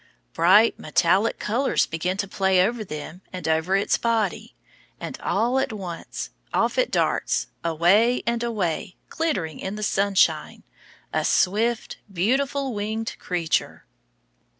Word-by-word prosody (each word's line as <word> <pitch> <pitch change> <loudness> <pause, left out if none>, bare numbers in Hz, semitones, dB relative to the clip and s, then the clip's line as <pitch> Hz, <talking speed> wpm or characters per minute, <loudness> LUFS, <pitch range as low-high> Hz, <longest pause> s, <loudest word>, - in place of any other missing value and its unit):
Bright 205 +7 +5
metallic 185 +8 +2
colors 245 +6 +1
begin 180 +4 -2
to 200 - -2
play 190 -1 +2
over 230 +1 -2
them 155 0 -8
and 185 -2 -5
over 160 +4 +1
its 195 - +1
body; 220 - -1 0.4
and - - -6
all 240 +6 +1
at - - -1
once 185 -6 -6 0.2
off - - +1
it - - +2
darts, - - 0 0.2
away 180 +9 +3
and 235 0 0
away, 195 -8 -2
glittering 190 - -2
in 190 +2 -4
the 215 - -5
sunshine, 200 -2 +1 0.5
a - - +1
swift, 220 +5 +1
beautiful 265 +8 0
winged 220 +2 -3
creature. 175 -3 -2
200 Hz, 125 wpm, -24 LUFS, 180-230 Hz, 0.5 s, Bright